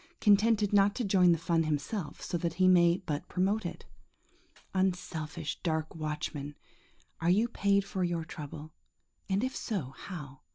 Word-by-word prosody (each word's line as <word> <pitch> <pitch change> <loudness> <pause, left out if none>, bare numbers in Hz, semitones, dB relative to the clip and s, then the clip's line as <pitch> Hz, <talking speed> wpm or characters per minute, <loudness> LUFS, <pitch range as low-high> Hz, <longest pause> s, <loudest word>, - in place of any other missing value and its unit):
Contented 210 0 +4
not 200 0 +4
to 250 - -1
join 185 -4 +5
the 170 - +3
fun 165 +1 +1
himself, 155 +3 -3
so - - -3
that 170 -1 -1
he 185 +1 +4
may 175 -1 +5
but 150 -3 -3
promote 190 +2 0
it. - - -9 0.9
Unselfish, 175 -4 -2
dark 160 -3 -1
watchman, 150 -2 -4 0.6
are 165 - +1
you 210 +6 +4
paid 200 -3 +1
for 190 -2 -2
your 170 -2 -1
trouble, 150 0 -8 0.6
and 195 +3 +1
if 260 0 -2
so, 165 - -3
how? 145 -8 -8
175 Hz, 155 wpm, -31 LUFS, 155-200 Hz, 0.9 s, join